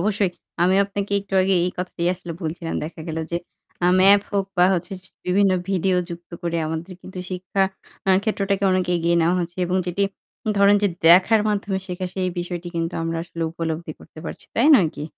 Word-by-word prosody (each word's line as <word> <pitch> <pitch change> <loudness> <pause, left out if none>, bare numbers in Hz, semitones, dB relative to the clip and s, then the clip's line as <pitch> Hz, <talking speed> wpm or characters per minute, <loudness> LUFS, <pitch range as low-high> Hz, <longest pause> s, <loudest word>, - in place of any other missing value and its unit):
অবশ্যই। 200 0 +1 0.3
আমি 185 +2 +4
আপনাকে 200 0 -4
একটু 195 -1 -7
আগে 190 0 +2
এই 180 - 0
কথাটাই 180 -1 -2
আসলে 175 -1 -8
বলছিলাম। 165 +1 -4
দেখা 160 +1 -8
গেল 160 0 -3
যে, 170 - 0 0.5
আ - - +5
ম্যাপ 200 +1 +7
হোক। 200 -1 +1
বা 180 - +7
হচ্ছে 180 +2 -3 0.3
বিভিন্ন 195 +1 +3 0.2
ভিডিও 190 -1 +1
যুক্ত 170 0 -9
করে, 170 -1 -1
আমাদের 160 +4 -4
কিন্তু 185 0 -9
শিক্ষা 185 +1 -1 0.6
ক্ষেত্রটাকে 200 -2 0
অনেক 185 -1 +2
এগিয়ে 170 0 +1
নেওয়া 170 +2 +3
হচ্ছে। 175 +1 -5
এবং 180 +1 0
যেটি 180 +3 -1 0.5
ধরেন 200 +1 +6
যে 205 - +4 0.2
দেখার 190 +6 +7
মাধ্যমে 200 -2 -1
শেখা। 185 0 -4
সেই 185 -1 0
বিষয়টি 175 0 -4
কিন্তু 165 +1 -2
আমরা 165 0 -2
আসলে 170 -1 -6
উপলব্ধি 165 -1 -4
করতে - - -15
পারছি। - - -7
তাই 235 - +3
নয় 175 -6 +3
কি? 150 - -4
180 Hz, 185 wpm, -22 LUFS, 170-195 Hz, 0.6 s, ম্যাপ